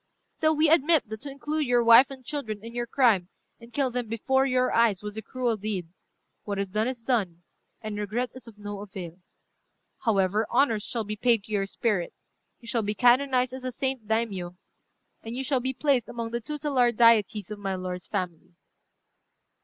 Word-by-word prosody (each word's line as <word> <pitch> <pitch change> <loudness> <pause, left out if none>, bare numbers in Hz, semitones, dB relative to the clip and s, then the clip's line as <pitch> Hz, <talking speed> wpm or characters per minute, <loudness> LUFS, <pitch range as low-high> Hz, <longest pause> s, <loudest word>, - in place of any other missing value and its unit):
Still 315 0 0
we 310 +1 +4
admit 315 -3 +4
that 220 0 -7
to 290 - -6
include 295 +2 -2
your 245 -1 +3
wife 235 +3 +8
and 265 -2 -10
children 225 -6 -4
in 230 - -8
your 240 0 -3
crime, 225 -9 +3 0.3
and 235 0 -14
kill 270 0 0
them 245 -1 -3
before 265 +5 +1
your 255 -1 +1
eyes, 220 -4 +3
was 210 0 -5
a 220 - -4
cruel 240 0 -2
deed. 195 -5 -4 0.5
What 205 -1 -4
is 200 -1 -2
done, 215 +4 0
is 250 -3 -5
done, 195 -9 -1 0.4
and 210 -1 -4
regret 220 +4 -2
is 255 -1 -11
of 220 -2 -13
no 205 -1 -6
avail. 190 -4 -8 0.8
However, 210 -1 +1
honours 230 -7 +2
shall 230 +2 -2
be 210 0 -4
paid 230 -1 +2
to 215 - -14
your 200 -2 0
spirit: 200 -4 -1 0.5
you 235 - -15
shall 230 0 0
be 210 0 -2
canonized 250 +2 +3
as 260 - -6
the 255 0 -4
Saint 260 -3 -3
Daimiyô, 200 -6 -1 0.7
and 225 +1 -7
you 265 - -3
shall 270 -1 +1
be 260 +1 -2
placed 265 -3 +1
among 230 -1 -5
the 235 0 -2
tutelar 275 -2 +1
deities 215 -3 +3
of 210 - -6
my 195 -1 -2
lord's 185 -1 -5
family." 180 -4 -4
230 Hz, 195 wpm, -27 LUFS, 205-255 Hz, 0.8 s, wife